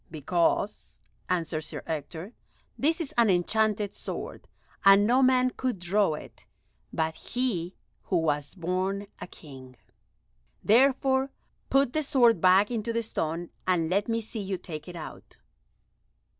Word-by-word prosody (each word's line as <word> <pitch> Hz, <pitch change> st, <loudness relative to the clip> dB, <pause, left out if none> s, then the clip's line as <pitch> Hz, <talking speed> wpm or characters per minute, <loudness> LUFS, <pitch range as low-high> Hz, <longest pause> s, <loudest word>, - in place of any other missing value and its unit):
"Because," 170 Hz, +6 st, -1 dB, 0.3 s
answered 165 Hz, -3 st, -1 dB
Sir 155 Hz, -, -7 dB
Ector, 160 Hz, -, -5 dB, 0.4 s
"this 320 Hz, +4 st, +1 dB
is 325 Hz, -5 st, -4 dB
an 230 Hz, -2 st, +5 dB
enchanted 205 Hz, +3 st, +1 dB
sword, -, -, -7 dB, 0.4 s
and 195 Hz, +1 st, +7 dB
no 250 Hz, +4 st, +4 dB
man 255 Hz, -1 st, +4 dB
could 255 Hz, -4 st, -2 dB
draw 180 Hz, -1 st, +1 dB
it -, -, -12 dB, 0.4 s
but 160 Hz, 0 st, -1 dB
he 190 Hz, -6 st, -2 dB, 0.3 s
who 185 Hz, -, +1 dB
was 150 Hz, -2 st, -1 dB
born 185 Hz, +3 st, -2 dB
a -, -, -7 dB
King. 130 Hz, -7 st, -13 dB, 0.9 s
Therefore 265 Hz, +3 st, +3 dB, 0.4 s
put 275 Hz, -2 st, +3 dB
the 310 Hz, -, +1 dB
sword 240 Hz, -, +3 dB
back 190 Hz, +4 st, +5 dB
into 230 Hz, -1 st, -2 dB
the 230 Hz, 0 st, -1 dB
stone, 165 Hz, -5 st, -3 dB, 0.2 s
and 170 Hz, -3 st, +1 dB
let 200 Hz, +2 st, +1 dB
me 230 Hz, 0 st, 0 dB
see 220 Hz, 0 st, -6 dB
you 190 Hz, -1 st, -3 dB
take 155 Hz, -4 st, -8 dB
it 180 Hz, -, -8 dB
out." 160 Hz, -2 st, -10 dB
195 Hz, 140 wpm, -27 LUFS, 165-235 Hz, 0.9 s, and